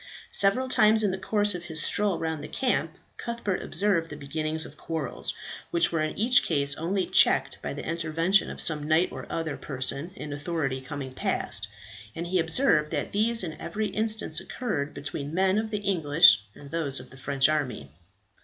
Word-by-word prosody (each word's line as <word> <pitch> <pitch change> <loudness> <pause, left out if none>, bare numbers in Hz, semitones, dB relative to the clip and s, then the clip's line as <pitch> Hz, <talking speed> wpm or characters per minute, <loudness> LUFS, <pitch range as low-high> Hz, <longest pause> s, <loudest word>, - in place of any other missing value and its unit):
Several 210 +7 +2
times 220 -3 +4
in 200 - +2
the 190 - -3
course 205 +1 +1
of 175 -1 -6
his 160 -2 -3
stroll 200 +2 +1
round 160 -2 -3
the - - -6
camp 255 -2 -1 0.2
Cuthbert 235 -5 -3
observed 190 -5 0
the 150 - -7
beginnings 155 +2 -2
of 150 - -11
quarrels, 155 -3 -4 0.3
which 170 0 +2
were 165 -2 0
in 155 - -2
each 245 +4 +5
case 145 -3 +1
only 185 +4 -1
checked - - +3
by - - -4
the - - -6
intervention 165 +3 +1
of - - -8
some 150 -2 +2
knight 160 +3 +3
or - - -8
other 160 -3 -3
person 135 +3 -1
in 150 - -6
authority 145 -3 -2
coming 130 -1 -6
past, - - 0 0.5
and 170 - -4
he 180 +1 0
observed 160 - +2
that - - -2
these 225 +1 +2
in 160 -3 -4
every 210 +5 -2
instance 220 0 0
occurred 160 - -4
between 145 +1 -5
men 190 +2 +3
of 220 0 -3
the 210 - -2
English 165 - +5
and 140 - -12
those 155 -5 0
of - - -12
the - - -13
French 135 +1 +2
army. 125 - -2
165 Hz, 185 wpm, -27 LUFS, 145-200 Hz, 0.5 s, each